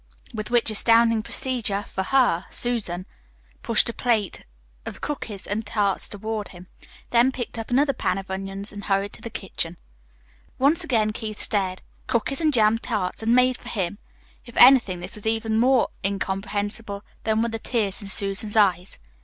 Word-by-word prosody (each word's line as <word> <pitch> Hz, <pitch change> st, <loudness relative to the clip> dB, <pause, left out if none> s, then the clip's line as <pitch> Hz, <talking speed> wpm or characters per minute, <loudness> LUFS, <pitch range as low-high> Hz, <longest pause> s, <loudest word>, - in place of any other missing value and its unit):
With 215 Hz, 0 st, -5 dB
which 240 Hz, -2 st, +2 dB
astounding 230 Hz, +1 st, +4 dB
procedure 220 Hz, -4 st, -1 dB
for 190 Hz, -, -4 dB
her 195 Hz, -5 st, +2 dB
Susan 200 Hz, -7 st, -1 dB, 0.6 s
pushed 230 Hz, 0 st, +3 dB
a 235 Hz, -, 0 dB
plate 225 Hz, -7 st, -1 dB, 0.4 s
of -, -, -7 dB
cookies 230 Hz, -9 st, -5 dB
and 210 Hz, +2 st, -2 dB
tarts 205 Hz, -2 st, 0 dB
toward 215 Hz, 0 st, -4 dB
him, 180 Hz, -1 st, -13 dB, 0.5 s
then 245 Hz, +2 st, +4 dB
picked 245 Hz, -2 st, -5 dB
up 225 Hz, -, -6 dB
her 265 Hz, +4 st, +4 dB
pan -, -, -1 dB
of 190 Hz, -1 st, -7 dB
onions 195 Hz, +2 st, -4 dB
and 205 Hz, -1 st, -7 dB
hurried 195 Hz, 0 st, +1 dB
into -, -, -5 dB
the 230 Hz, -, -6 dB
kitchen. 180 Hz, -5 st, -4 dB, 0.8 s
Once 285 Hz, +5 st, +3 dB
again 215 Hz, -4 st, +1 dB
Keith 215 Hz, -1 st, -5 dB
stared. 190 Hz, -3 st, 0 dB, 0.2 s
Cookies 270 Hz, +6 st, -1 dB
and 310 Hz, -1 st, +3 dB
jam 225 Hz, -3 st, +3 dB
tarts, 210 Hz, -6 st, -3 dB
and 230 Hz, +2 st, +3 dB
made 250 Hz, 0 st, +4 dB
for 245 Hz, -, -9 dB
him? 200 Hz, -3 st, -3 dB, 0.4 s
If 240 Hz, -, -13 dB
anything, 240 Hz, -9 st, +7 dB
this -, -, -4 dB
was 210 Hz, 0 st, -4 dB
even 225 Hz, 0 st, 0 dB
more 255 Hz, +1 st, +4 dB
incomprehensible 200 Hz, +1 st, -3 dB, 0.2 s
than 220 Hz, 0 st, +1 dB
were 235 Hz, -, 0 dB
the 225 Hz, 0 st, -4 dB
tears 215 Hz, -5 st, -1 dB
in 200 Hz, -, -7 dB
Susan's 200 Hz, +1 st, -1 dB
eyes. 185 Hz, -3 st, +2 dB
215 Hz, 170 wpm, -24 LUFS, 195-235 Hz, 0.8 s, anything